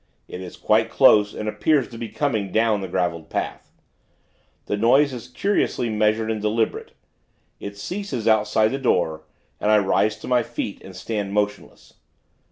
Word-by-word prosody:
It 90 - -8
is 90 - -9
quite 110 +1 +2
close, 105 -6 +5
and 110 - -5
appears 130 +6 +1
to 115 - -10
be 115 -2 -5
coming 110 -10 -1
down 110 -1 +2
the 95 - -4
graveled 85 -3 -2
path. - - -4 0.9
The - - -1
noise 130 +6 +3
is 120 -3 -7
curiously 125 - -1
measured 110 +1 +1
and 110 -1 -3
deliberate. 110 +1 -1 0.7
It 100 0 -7
ceases 155 - -4
outside 110 0 +3
the 135 - -2
door; 80 -11 0 0.3
and 105 - 0
I 110 - +6
rise 105 +1 +1
to - - -8
my 125 -1 +3
feet, 115 -4 -5
and 95 -1 -11
stand 105 -3 -4
motionless. 105 0 -3
110 Hz, 165 wpm, -23 LUFS, 105-120 Hz, 0.9 s, I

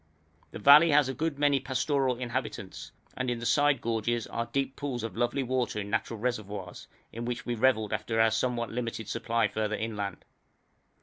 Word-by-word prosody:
The - - -8
valley 145 +9 +8
has 145 -2 +4
a - - -2
good 155 +2 -2
many 145 -1 +3
pastoral 135 -1 0
inhabitants, 120 -6 -5 0.2
and 130 0 -2
in 120 - -1
the 120 - -6
side 145 +2 +3
gorges 115 0 -1
are 115 0 -4
deep 135 +2 -2
pools 130 -5 -4
of 115 - -5
lovely 120 +3 0
water 125 -3 -1
in 100 0 -5
natural 110 +1 -1
reservoirs, 105 -5 -4 0.3
in 115 - -5
which 120 0 -4
we 120 - -1
revelled 110 -3 +2
after 105 +2 -1
our 110 0 +5
somewhat 120 +1 -1
limited 115 -2 -4
supply 115 -1 0
further 110 +1 -2
inland. 105 -4 -4
120 Hz, 180 wpm, -29 LUFS, 110-130 Hz, 0.3 s, valley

